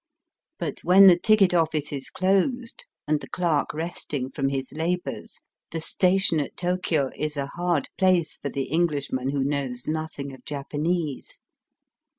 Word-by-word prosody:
But - - -4
when 190 +2 +7
the 185 -2 +9
ticket 200 +1 +4
oflBce 155 -4 0
is 135 - -7
closed 235 - 0 0.2
and 150 0 +2
the - - -10
clerk 170 -5 0
resting 150 -5 -4
from 135 0 -1
his 135 -1 -3
labours, 175 +3 -3 0.3
the 165 - -4
station 185 0 +2
at 145 - -4
Tokio 175 -6 0
is 150 0 -3
a 140 - -1
hard 175 -4 0
place 185 -4 +3
for 140 - -5
the 135 +1 -2
Englishman 145 -4 0
who 140 -1 0
knows 135 -3 -3
nothing 155 -3 -4
of 130 - -13
Japanese. 150 +1 -3
155 Hz, 150 wpm, -25 LUFS, 140-180 Hz, 0.3 s, the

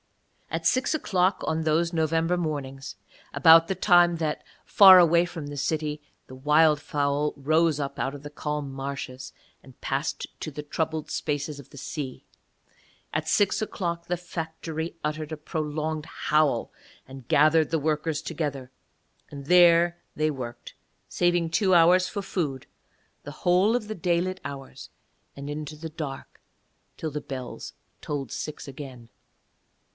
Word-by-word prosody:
At 165 0 -4
six 255 - +2
o'clock 190 -10 +1
on 160 0 -1
those 160 +2 +1
November 165 +1 +1
mornings, 135 - -4 0.4
about 165 0 +7
the 190 - -1
time 175 -2 +4
that, 155 -2 -2 0.2
far 190 -2 +9
away 170 0 +5
from 165 -4 -7
the 145 - -7
city, 150 +1 -2 0.3
the 130 - -11
wildfowl 150 0 +2
rose 155 +2 +2
up 140 -1 -4
out 135 +1 -2
of 140 - -11
the 145 - -8
calm 150 -2 -4
marshes 135 -1 -6 0.3
and - - -17
passed - - -2
to 155 - -4
the 150 +1 -7
troubled 155 +1 -3
spaces 145 0 -2
of 140 - -13
the - - -14
sea, 140 -1 -6 0.9
at 155 +1 -1
six 205 +1 +2
o'clock 170 -5 -3
the 180 - -1
factory 165 -1 -5
uttered 155 0 -3
a 155 - -4
prolonged 155 0 -3
howl 150 -2 +1 0.4
and 135 -2 -11
gathered 155 +1 +4
the 160 - 0
workers 155 0 -1
together, 145 -5 -4 0.6
and 140 -1 -9
there 175 +1 +5 0.2
they 155 0 +1
worked, 125 -4 -7 0.3
saving 175 -1 +1
two 185 +3 +2
hours 180 +2 +5
for 200 -2 -4
food, 145 -9 -3 0.6
the 145 - -7
whole 180 +5 +4
of 215 -4 -2
the 215 - -4
daylit 180 +1 0
hours 135 -1 -8 0.5
and 140 +1 -7
into 150 +1 -5
the 160 +1 -7
dark 150 -4 -7 0.6
till 160 - -4
the 150 +1 -4
bells 130 -3 -7 0.3
tolled 140 -5 -4
six 155 -1 -6
again. 130 -4 -9
155 Hz, 145 wpm, -26 LUFS, 145-170 Hz, 0.9 s, far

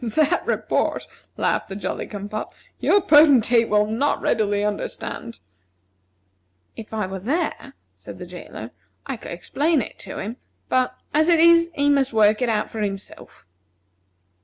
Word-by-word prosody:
"That 305 +9 +1
report," - - -1 0.3
laughed - - 0
the 195 - -6
Jolly 190 -2 -4
cum 205 -1 -6
pop, 215 +1 -6 0.2
"your 405 - +3
Potentate 270 - +5
will 210 0 +3
not 230 +7 0
readily 205 -2 0
understand." 200 - -4 1.4
"If 220 - -10
I 215 -3 -2
were 190 +1 -6
there," 280 - -3 0.2
said - - -11
the - - -8
jailer, - - -9 0.3
"I - - -4
could - - -10
explain 310 +1 0
it 235 - -6
to - - -7
him; 220 +5 -5 0.3
but, 255 0 +1 0.2
as 310 +3 +3
it 335 -2 +5
is, 335 0 +6
he 285 0 +1
must 275 -3 +2
work 215 0 +4
it 250 - +1
out 215 -2 -1
for 220 - -5
himself." 195 -1 -6
230 Hz, 155 wpm, -22 LUFS, 210-290 Hz, 1.4 s, is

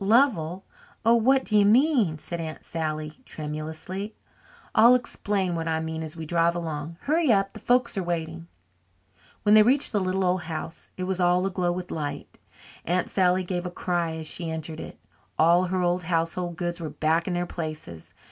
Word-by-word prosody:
"Lovell, 195 - +2 0.4
oh, 230 - +6
what 260 +3 +3
do 215 - -1
you 205 - +6
mean?" 225 - +4
said 170 +2 -6
Aunt 160 -1 -6
Sally 155 -1 -4
tremulously. 160 +7 -6 0.6
"I'll 235 +3 +7
explain 205 -6 -1
what 165 -1 -3
I 160 -1 0
mean 160 0 -4
as 160 0 -6
we 160 - -5
drive 170 +1 +2
along. 165 -1 -4
Hurry 310 -1 +2
up 195 -2 +2
the - - -9
folks 245 -1 +2
are - - -2
waiting." 170 -1 -4 1.0
When 210 - +4
they 215 - +9
reached 260 +6 +4
the 210 - +1
little 185 +1 0
old 180 0 +1
house, 165 0 -7
it 185 - -3
was 185 0 -2
all 180 +1 +3
aglow 180 -2 0
with 180 0 -5
light. 145 -2 -5 0.4
Aunt 180 +2 0
Sally 185 -1 +3
gave 180 0 -3
a - - -3
cry 175 -2 -2
as 160 -1 -6
she 165 +1 -3
entered 160 0 -5
it. - - -8 0.4
All 170 +3 +5
her 185 0 -1
old 175 0 0
household 170 0 -1
goods 175 0 -3
were 160 - -4
back 160 +3 0
in 185 - -1
their 175 0 0
places. 155 - -7
175 Hz, 185 wpm, -26 LUFS, 160-195 Hz, 1.0 s, they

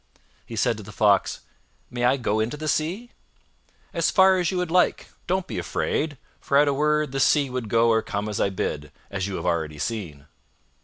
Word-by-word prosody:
He - - -7
said - - +1
to - - -8
the - - -10
Fox, - - +2 0.5
"May 120 0 -1
I 130 +2 +4
go 110 -4 0
into 115 +7 -1
the 155 +1 -5
Sea?" 180 +11 -1 0.8
"As 170 -3 +1
far 190 0 +5
as 175 -1 +1
you 180 -1 -1
like. 180 +2 +1 0.2
Don't 185 0 0
be - - -4
afraid, 150 -2 -2 0.2
for 140 - +1
at 145 +1 +5
a 140 - +2
word, 150 0 +1
the 135 - -2
Sea 140 0 +3
would 125 -4 -4
go 115 +1 +3
or 110 0 +3
come 100 0 -4
as 105 - -2
I - - +2
bid, 75 -6 -3
and - - -18 0.2
as 95 -1 -2
you 100 - -4
have - - -5
already 80 -4 -1
seen." 75 -5 -5
130 Hz, 210 wpm, -24 LUFS, 105-155 Hz, 0.8 s, far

